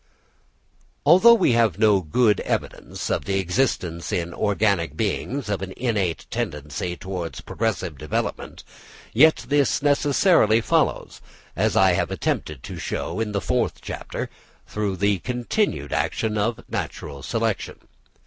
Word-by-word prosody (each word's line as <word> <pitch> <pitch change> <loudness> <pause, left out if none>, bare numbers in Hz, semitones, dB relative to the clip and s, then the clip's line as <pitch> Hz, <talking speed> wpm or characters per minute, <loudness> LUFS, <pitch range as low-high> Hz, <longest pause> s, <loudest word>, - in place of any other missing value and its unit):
Although 185 +10 +8
we 220 - +3
have 115 -7 +2
no 105 -3 +4
good 105 +7 +2
evidence - - -3
of - - -1
the 95 -1 0
existence 90 - -1
in 85 0 -2
organic 100 -6 0
beings 135 0 -2
of 100 -2 -2
an 95 -1 -6
innate 105 -9 -1
tendency 75 +4 -3
towards 90 -3 -5
progressive 95 - -3
development, 75 -1 -4 0.5
yet 135 0 +5
this 140 0 +2
necessarily 145 - +4
follows, 115 - 0 0.3
as - - +1
I 95 -1 +6
have 85 - 0
attempted 75 -4 -3
to - - -7
show 90 - -3
in 110 -2 -1
the 100 -1 -1
fourth 85 - 0
chapter, - - -6 0.3
through 105 -2 -2
the 100 0 +1
continued 120 - -1
action 110 -1 -1
of 110 +2 -1
natural 70 -1 -5
selection. - - -2
105 Hz, 130 wpm, -23 LUFS, 85-120 Hz, 0.5 s, Although